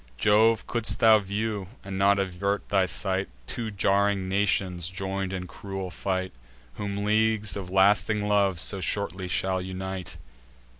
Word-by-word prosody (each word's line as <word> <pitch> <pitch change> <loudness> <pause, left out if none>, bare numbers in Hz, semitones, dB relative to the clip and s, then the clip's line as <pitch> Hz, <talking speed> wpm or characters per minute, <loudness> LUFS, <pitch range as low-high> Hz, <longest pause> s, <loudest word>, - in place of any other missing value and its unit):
Jove, 110 - +3
could'st 115 -2 +1
thou 110 -1 +7
view, 100 0 -3 0.2
and 95 0 -6
not 100 +1 +4
avert 100 +1 -2
thy 95 -2 +2
sight, 95 0 -1 0.2
Two 115 - -4
jarring 100 -1 +1
nations 95 -3 0
join'd 95 0 -3
in 95 -1 -4
cruel 95 0 -6
fight, 95 +2 -2 0.4
Whom 100 +2 -4
leagues 110 -2 +2
of 95 -3 -6
lasting 105 +2 +3
love 100 -4 +2
so 95 +1 0
shortly 95 0 -2
shall 95 +1 0
unite! 95 0 -6
100 Hz, 140 wpm, -26 LUFS, 95-105 Hz, 0.4 s, thou